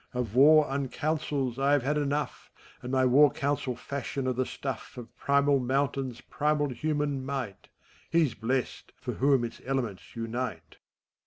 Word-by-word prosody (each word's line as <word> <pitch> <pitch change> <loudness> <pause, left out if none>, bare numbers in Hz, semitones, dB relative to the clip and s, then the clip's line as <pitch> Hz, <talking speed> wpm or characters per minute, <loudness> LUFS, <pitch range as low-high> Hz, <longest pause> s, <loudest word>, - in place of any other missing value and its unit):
Of 120 -4 -2
War 150 +4 +7
Uncouncils 140 -1 -2
I 140 +1 +3
have 145 -4 +3
had 145 +3 +1
enough, 145 0 -2 0.3
And 125 - -6
my 130 -1 +3
War 140 +4 +6
Council 140 -3 -1
fashion 140 +1 -4
of 130 -1 0
the 130 +1 0
stuff 135 -1 -6
Of 120 -2 -10
primal 140 0 +3
mountains' 130 -1 -1
primal 150 +1 0
human 145 +1 -1
might: 130 -8 -5 0.4
He's 160 -6 +3
blest, 125 +3 -3
for - - -5
whom 135 -2 +3
its 115 - -6
elements 125 -8 -3
unite 115 -5 -4
135 Hz, 150 wpm, -28 LUFS, 125-145 Hz, 0.4 s, War